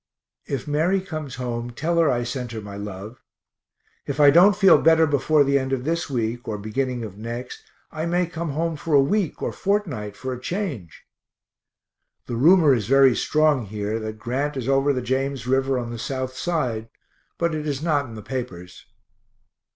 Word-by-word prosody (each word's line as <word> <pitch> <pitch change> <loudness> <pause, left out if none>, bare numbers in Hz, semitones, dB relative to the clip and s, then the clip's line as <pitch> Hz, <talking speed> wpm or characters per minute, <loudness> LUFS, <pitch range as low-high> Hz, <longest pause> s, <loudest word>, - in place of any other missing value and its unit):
If 140 0 -4
Mary 160 +6 +1
comes 155 -8 -6
home, 120 -1 -4
tell 165 +8 -1
her 165 -3 +4
I 120 -2 0
sent 125 -1 -5
her 110 - -5
my 100 -1 -9
love. 100 +3 -8 0.9
If 140 +1 -3
I 145 -1 +8
don't 180 +6 +6
feel 195 -2 +6
better 160 0 +5
before 145 +1 +3
the 140 0 +2
end 130 0 -3
of 130 -2 -1
this 165 +3 -2
week 120 -2 -2
or 105 - -3
beginning 120 +4 -3
of 105 -2 -8
next, 120 +3 -6 0.3
I 160 +2 -3
may 175 +1 +1
come 165 -3 -5
home 165 +1 -1
for 150 0 0
a - - +7
week 170 +5 0
or - - -1
fortnight 160 - -2
for 130 0 -4
a 125 - -8
change. 145 - -5 1.2
The 120 - -4
rumor 155 +3 +5
is 115 -5 -1
very 135 -1 +5
strong 150 -7 +2
here 105 +2 -3
that 110 0 -6
Grant 135 +6 -2
is 130 -2 -4
over 135 +1 +3
the 130 -3 -2
James 135 +1 -2
river 135 +1 +1
on 120 -1 -4
south 130 +1 -4
side 130 -7 -2 0.5
but 170 -1 0
it 155 -1 -3
is 145 0 -3
not 150 -4 +1
in 115 - -10
the 105 - -9
papers. 110 -7 -7
135 Hz, 185 wpm, -23 LUFS, 120-155 Hz, 1.2 s, I